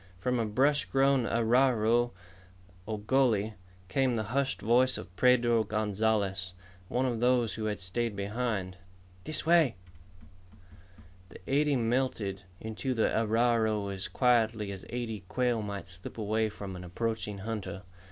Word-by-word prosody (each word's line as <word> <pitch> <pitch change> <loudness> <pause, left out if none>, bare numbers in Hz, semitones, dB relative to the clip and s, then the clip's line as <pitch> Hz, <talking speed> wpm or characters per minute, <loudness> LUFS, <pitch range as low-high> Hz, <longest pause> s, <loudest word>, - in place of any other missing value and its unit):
From 125 +6 0
a 115 - 0
brush 135 +7 +2
grown 135 -2 +2
arroyo, 120 0 +3 0.8
or 110 -1 -2
gully, 110 -3 +2 0.3
came 125 +6 +1
the 110 - -1
hushed 140 0 0
voice 125 +3 +3
of 90 - -10
Pedro 120 -2 +4
Gonzalez, 105 -3 0 0.3
one 125 +6 0
of 120 -3 -1
those 120 -2 +2
who 110 - -4
had 105 -1 -2
stayed 105 +4 -2
behind. 100 -2 -2 0.5
"This 155 -1 -3
way." 165 - +4 1.5
The - - -11
eighty 145 +1 +2
melted 115 -5 -1 0.2
into 110 +4 -3
the 110 - +1
arroyo 110 -2 +2
as 95 -1 -4
quietly 115 -4 +2
as 95 -1 -8
eighty 120 -3 -3
quail 125 -1 0
might 100 -1 -5
slip 90 +3 -9
away 110 0 0
from 100 -2 -7
an 90 - -8
approaching 105 +3 -3
hunter. 105 -1 -5
115 Hz, 135 wpm, -30 LUFS, 105-125 Hz, 1.5 s, Pedro